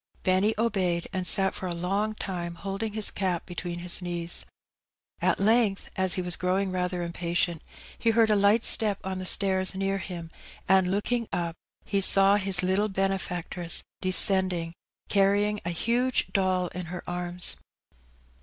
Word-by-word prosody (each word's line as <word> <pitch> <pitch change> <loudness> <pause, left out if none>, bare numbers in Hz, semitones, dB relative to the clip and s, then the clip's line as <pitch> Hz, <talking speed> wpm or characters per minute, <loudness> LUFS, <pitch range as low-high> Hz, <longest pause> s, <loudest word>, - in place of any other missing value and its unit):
Benny 190 +3 +2
obeyed, 190 -7 0
and 185 -1 -1
sat 190 -1 +5
for 185 - -5
a 175 - -4
long 200 +5 -2
time 175 -4 -5
holding 200 +4 -5
his 215 -1 +1
cap 185 -3 -2
between 175 -1 -6
his 175 +1 -1
knees. 175 -1 -4 0.7
At - - +1
length, 215 -1 +1
as 190 -3 +4
he 185 - -2
was 180 -1 +2
growing 185 +1 -1
rather 180 -1 -2
impatient, 170 -1 -2 0.4
he 230 - +1
heard 225 -1 +3
a - - +4
light 205 +3 +3
step 210 -3 +5
on 190 0 -4
the 185 - -4
stairs 190 -1 0
near 195 0 -1
him, 170 -2 -7 0.4
and, 190 -1 +3
looking 225 +4 -1
up, 170 -1 -2 0.3
he 200 -1 0
saw 195 +1 +5
his 190 -2 +3
Uttle 190 +3 0
benefactress 185 -3 -1 0.2
descending, 185 -3 +2 0.3
carry 200 +1 +3
ing 210 0 -2
a - - -1
huge 240 +9 0
doll 185 -2 +1
in 180 -1 -7
her 180 +1 -7
arms. 175 0 -3
190 Hz, 160 wpm, -27 LUFS, 180-200 Hz, 0.7 s, sat